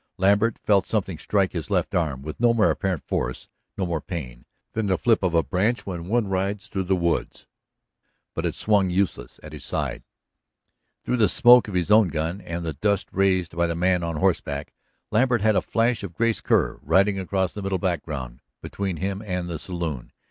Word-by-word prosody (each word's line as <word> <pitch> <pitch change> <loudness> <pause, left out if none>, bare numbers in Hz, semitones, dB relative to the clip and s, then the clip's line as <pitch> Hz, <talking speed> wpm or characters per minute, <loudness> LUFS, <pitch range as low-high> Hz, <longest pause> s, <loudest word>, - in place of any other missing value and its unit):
Lambert 100 +4 +3
felt 100 -3 +2
something 95 -7 -1
strike 100 +1 +1
his 85 -4 -5
left - - 0
arm, 75 -6 -1
with 75 +1 -7
no 120 0 +4
more 110 -2 +4
apparent 95 -5 -2
force, 65 +1 -3 0.3
no 95 - 0
more 85 -3 -2
pain, 65 -10 -7 0.3
than 110 -2 -1
the 95 -1 +2
flip 115 -2 +2
of 90 -3 0
a 80 - +4
branch 105 +6 0
when 85 -3 -5
one 115 +1 +1
rides 95 +2 -2
through 95 -2 -3
the 95 +1 +2
woods. 85 -2 -1 0.9
But - - -2
it - - -3
swung 100 -3 +2
useless 90 -9 -2
at 75 0 -10
his 75 -3 -9
side. - - -3 1.0
Through 125 - 0
the 110 -3 +4
smoke 125 -2 +7
of 100 - -6
his 90 +2 0
own 110 -2 +6
gun, 80 +4 -3
and 85 -1 -5
the 80 - -2
dust 100 +6 0
raised 95 -3 +1
by 85 0 +2
the 85 - -2
man 90 +1 +2
on 85 -1 -2
horseback, 70 -1 -1 0.4
Lambert 120 0 +2
had 110 0 +3
a - - +3
flash 115 0 0
of 95 -5 -7
Grace 115 +2 +1
Kerr - - +1
riding 100 +1 +2
across 95 -1 -1
the 105 - -6
middle 95 -1 -1
background 75 -9 -3 0.2
between 95 -4 -4
him 95 +3 -3
and 90 -3 -3
the 85 -3 -4
saloon. 85 -9 -4
95 Hz, 200 wpm, -24 LUFS, 85-100 Hz, 1.0 s, smoke